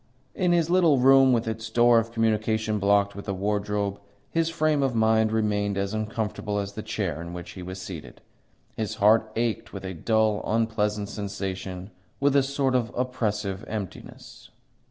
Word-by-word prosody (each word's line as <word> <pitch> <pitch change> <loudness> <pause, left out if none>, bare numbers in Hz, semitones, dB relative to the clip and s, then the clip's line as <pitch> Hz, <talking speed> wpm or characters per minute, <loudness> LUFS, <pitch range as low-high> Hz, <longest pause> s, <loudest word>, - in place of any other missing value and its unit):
In 180 -2 +1
his 170 -1 +2
little 170 -6 +5
room, 135 +1 +6
with 115 -2 +1
its 110 0 -4
door 120 +1 +5
of 115 0 -4
communication 110 -1 0
blocked 100 0 +2
with 100 - -8
a 100 - -1
wardrobe, 100 0 -1 0.3
his 165 0 +1
frame 155 -3 +1
of 135 -3 0
mind 110 -1 +3
remained 105 -2 0
as 100 +1 -2
uncomfortable 110 -1 -3
as 100 0 -3
the 110 - -5
chair 80 -6 -3
in 85 0 -7
which 90 0 -7
he 90 - -9
was 95 +1 -7
seated. 90 -4 -8 0.6
His 110 -3 -3
heart 110 +1 +4
ached 115 -1 -2
with 95 -1 -7
a 95 - -4
dull, 110 +4 +1
unpleasant 105 -2 0
sensation, 95 -2 -5 0.3
with 140 0 +2
a 140 - +6
sort 135 -1 0
of 120 -2 0
oppressive 105 -6 -2
emptiness. 105 -4 -8
110 Hz, 170 wpm, -26 LUFS, 100-120 Hz, 0.6 s, room